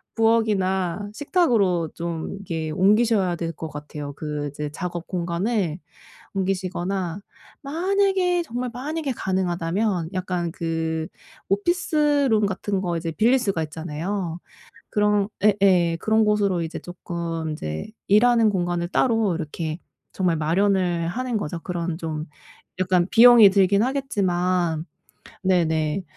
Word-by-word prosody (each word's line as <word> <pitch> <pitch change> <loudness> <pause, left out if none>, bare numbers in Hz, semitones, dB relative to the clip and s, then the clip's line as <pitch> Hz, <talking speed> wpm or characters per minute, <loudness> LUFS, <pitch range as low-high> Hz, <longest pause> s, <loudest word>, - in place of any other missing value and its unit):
부엌이나 205 -4 +1 0.3
식탁으로 185 - +2
좀 170 -1 -4
이렇게 165 -5 -4
옮기셔야 200 +1 +3
될 165 0 -3
것 160 - -7
같아요. 150 -1 -7
그 150 -1 -4
이제 150 +1 -5
작업 175 +1 -5
공간을 180 0 -1 0.6
옮기시거나 185 -1 -2 0.4
만약에 365 +3 +1
정말 245 -4 -4
만약에 290 +4 -3
가능하다면 185 -2 -1
약간 180 -2 -2
그 160 -1 -2 0.4
오피스룸 285 - +2
같은 195 0 -2
거 175 -3 -2
이제 165 0 -3
빌릴 230 +11 +3
수가 195 -9 -1
있잖아요. 165 +3 -4 0.5
그런 210 -1 +2
예예 190 -5 +4
그런 220 0 +3
곳으로 200 -4 +2
이제 160 - -5
쪼끔 170 -2 -5
이제 75 - -5 0.2
일하는 230 +2 +5
공간을 175 -2 -1
따로 225 -2 +2
이렇게 160 0 -4 0.3
정말 180 -3 +1
마련을 175 +1 +1
하는 245 +5 -2
거죠. 170 -4 -4
그런 175 -2 -3
좀 155 -2 -4 0.6
약간 180 -1 +2
비용이 235 -3 +9
들긴 200 +1 +3
하겠지만 185 - 0 0.6
네네 165 -2 +1
185 Hz, 270 characters per minute, -23 LUFS, 165-215 Hz, 0.6 s, 비용이